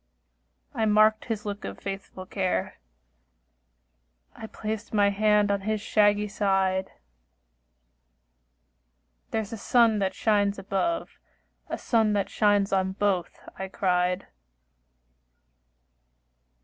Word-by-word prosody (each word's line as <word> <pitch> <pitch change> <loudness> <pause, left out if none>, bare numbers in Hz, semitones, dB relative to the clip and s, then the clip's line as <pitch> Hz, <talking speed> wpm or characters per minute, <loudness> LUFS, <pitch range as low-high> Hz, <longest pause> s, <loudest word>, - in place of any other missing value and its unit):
I 220 - 0
marked 215 +1 +4
his 220 -3 -4
look 205 0 -5
of - - -6
faithful 195 -1 -7
care, 185 - -2 1.6
I 220 - -8
placed 220 0 -5
my 200 -1 +4
hand 210 0 +3
on 200 -1 0
his 215 +2 -1
shaggy 205 0 +2
side; 195 -2 0 2.4
"There 220 - -1
is 215 +1 -8
a - - -4
sun 225 0 +3
that 190 -1 -1
shines 205 -2 +1
above, 200 - -2 0.5
A - - -3
sun 220 -3 +1
that 200 -1 -1
shines 205 -2 +2
on 190 0 +1
both," 195 -3 -1 0.2
I 190 - -3
cried. 180 -1 0
205 Hz, 110 wpm, -26 LUFS, 195-215 Hz, 2.4 s, marked